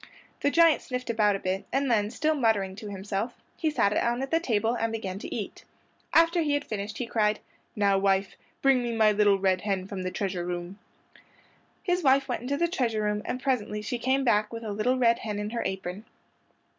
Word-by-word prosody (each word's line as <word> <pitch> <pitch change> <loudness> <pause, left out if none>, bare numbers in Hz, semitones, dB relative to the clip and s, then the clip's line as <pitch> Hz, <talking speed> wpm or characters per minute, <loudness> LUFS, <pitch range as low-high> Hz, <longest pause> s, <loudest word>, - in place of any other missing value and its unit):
The - - +2
giant 330 +1 +5
sniffed 250 -1 -3
about 210 -3 +3
a - - -3
bit, 190 +1 -2
and 270 -1 +1
then, 210 -2 +2
still 305 +7 0
muttering 220 -8 +1
to 215 -2 -7
himself, 200 +4 -3 0.2
he 315 - 0
sat 205 -9 +2
down 240 +4 0
at 270 - -5
the 330 - +3
table 225 -7 0
and 230 -2 -1
began 195 -4 -4
to - - -8
eat. - - -5 0.5
After 335 +1 +4
he 295 -2 +1
had 290 - -2
finished 215 0 -5
he 245 - -2
cried, 215 -2 +1 0.4
"Now 200 -2 +3
wife, 195 0 +1 0.3
bring 270 -2 +5
me 240 -1 -2
my 220 -1 +5
little 205 -1 +4
red 190 -1 +1
hen 195 -3 -1
from 195 -1 -5
the 185 - -2
treasure 185 -2 -3
room." 175 +2 -5 1.0
His 360 -1 +1
wife 270 -2 +4
went 245 - -2
into 275 +3 -2
the 340 - +2
treasure 235 - -1
room, 210 0 0
and 255 - -4
presently 210 -6 -1
she 240 +3 -3
came 265 +3 +1
back 210 -4 +2
with 230 0 -6
a 215 - -4
little 240 +5 +1
red 235 -2 +3
hen 210 -2 -4
in 210 +1 -3
her 235 - -2
apron. 190 +1 -5
220 Hz, 215 wpm, -27 LUFS, 200-255 Hz, 1.0 s, giant